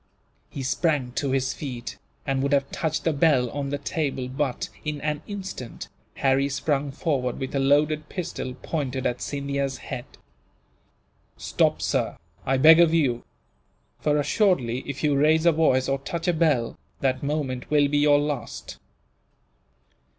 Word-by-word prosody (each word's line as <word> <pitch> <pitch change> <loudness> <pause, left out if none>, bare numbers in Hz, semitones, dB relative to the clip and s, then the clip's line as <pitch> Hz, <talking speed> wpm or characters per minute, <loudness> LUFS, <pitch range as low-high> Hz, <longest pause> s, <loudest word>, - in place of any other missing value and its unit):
He 135 - -6
sprang 140 -2 0
to 140 +2 -2
his 130 0 0
feet, 125 -5 -6 0.3
and 135 -2 0
would 140 +1 0
have 140 -1 +1
touched 160 -1 -2
the 165 - +1
bell 140 -5 +3
on 140 -1 -3
the 145 - -1
table 140 -3 -2
but, 130 0 -2 0.2
in 150 -1 -3
an 150 0 -2
instant, 195 - -7 0.3
Harry 135 +1 +2
sprung 140 0 0
forward 135 -4 -1
with 130 - -4
a 140 - +1
loaded 150 +2 +2
pistol, 160 -8 -4
pointed 135 -5 -2
at 120 - -1
Scindia's 140 -1 -2
head. 120 - -6 1.3
"Stop, - - +1
sir, - - 0 0.3
I 135 +1 +3
beg 160 +5 +8
of 165 -1 +5
you; 130 -7 +1 0.8
for 150 0 +1
assuredly, 145 - +2
if 140 +1 -5
you 145 -2 +3
raise 155 +3 +3
a 170 - +7
voice 150 -5 +2
or 135 0 0
touch 165 +5 -4
a 175 - +3
bell, 150 -8 +1 0.2
that 130 -1 +1
moment 140 -3 -2
will 145 -1 +4
be 145 +1 +1
your 145 0 +5
last." 145 -4 -4
140 Hz, 155 wpm, -25 LUFS, 130-155 Hz, 1.3 s, beg